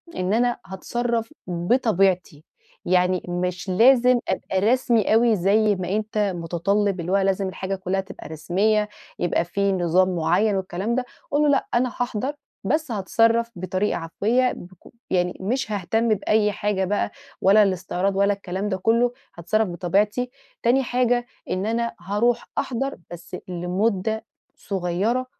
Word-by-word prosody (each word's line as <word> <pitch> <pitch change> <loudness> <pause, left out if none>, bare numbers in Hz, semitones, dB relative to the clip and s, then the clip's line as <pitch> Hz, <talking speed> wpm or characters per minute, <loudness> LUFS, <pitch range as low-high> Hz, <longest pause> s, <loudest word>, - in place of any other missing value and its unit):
إن 185 +3 -1
أنا 240 +1 +2
هاتصرّف 230 +6 -3
بطبيعتي، 180 - +1 0.4
يعني 180 0 +2
مش 180 +2 -2
لازم 250 +5 +5
أبقى 190 - -1
رسمي 230 0 +2
أوي 230 0 +4
زي 205 +3 +3
ما 185 -1 -4
أنت 215 0 -3 0.2
مُتطلِّب، 185 +4 0
اللي 175 +2 -3
هو 195 - +4
لازم 195 0 +1
الحاجة 190 +1 -4
كلّها 190 0 -1
تبقى 195 +1 -11
رسميّة 205 +7 +1 0.3
يبقى 175 -1 +1
في 200 +3 0
نظام 185 0 +2
معيّن 200 +5 +2
والكلام 190 +4 -2
ده." 255 - -1 0.3
قُل 290 - +2
له: 300 - +4
"لأ، 280 - +2
أنا 250 +1 +2
هاحضَر 245 +3 -3 0.3
بس 300 +6 0
هاتصرَّف 230 +3 +2
بطريقة 185 +3 -1
عفوية 225 +10 +1
بك 180 +1 -11 0.3
يعني 180 -1 0
مش 225 +3 -1
هاهتم 220 +4 0
بأي 210 +1 +2
حاجة 200 -2 -1
بقى 205 +2 -1 0.3
ولا 205 +3 +6
الإستعراض 190 0 -1
ولا 200 +1 +3
الكلام 195 +1 -4
ده 190 - -1
كلّه، 230 +5 +2 0.3
هاتصرّف 215 +6 +1
بطبيعتي، 200 +8 0 0.3
تاني 255 +3 +3
حاجة 245 0 +1 0.2
إن 185 +2 -1
أنا 235 +1 -1
هارُوح 230 +4 0
أحضَر 270 +2 -2
بس 175 +1 -8
لمدة 190 +4 -1 0.3
صغيّرة 195 +7 -1
200 Hz, 140 wpm, -23 LUFS, 185-230 Hz, 0.4 s, ولا